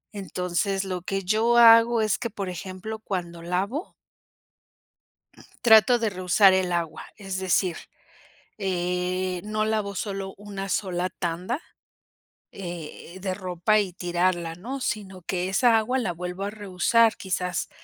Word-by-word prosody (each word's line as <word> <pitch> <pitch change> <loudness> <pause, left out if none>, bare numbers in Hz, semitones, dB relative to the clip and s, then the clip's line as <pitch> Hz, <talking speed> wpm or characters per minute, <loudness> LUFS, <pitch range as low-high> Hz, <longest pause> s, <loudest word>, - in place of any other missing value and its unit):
Entonces 190 0 -1
lo 185 -2 -3
que 195 +1 -3
yo 225 +5 +2
hago 230 0 +7
es 215 -2 +1
que 235 - -3
por 200 -3 -5
ejemplo 185 +4 -6
cuando 175 -5 -5
lavo 195 - -2 1.7
trato 225 +1 +7
de 225 -2 0
reusar 185 +1 +4
el 185 -2 +1
agua, 170 -2 -3
es 195 -3 -5
decir, 185 -2 +1 0.8
eh, 180 -1 -1
no 215 0 -1
lavo 215 -2 -1
solo 195 -1 -4
1 200 -1 -6
sola 185 -2 -1
tanda, 180 - -3 0.9
eh, 175 0 -8
de 190 -2 -2
ropa 185 +2 +1
y 190 -4 -2
tirarla, 175 -2 -1
¿no? 250 +10 -6
Sino 195 -6 -4
que 180 +1 -2
esa 230 +3 +4
agua 250 +4 0
la 190 -8 -1
vuelvo 180 +3 -5
a 200 - -2
reusar 215 +3 +2
quizás 180 -2 -2
190 Hz, 135 wpm, -25 LUFS, 180-215 Hz, 1.7 s, hago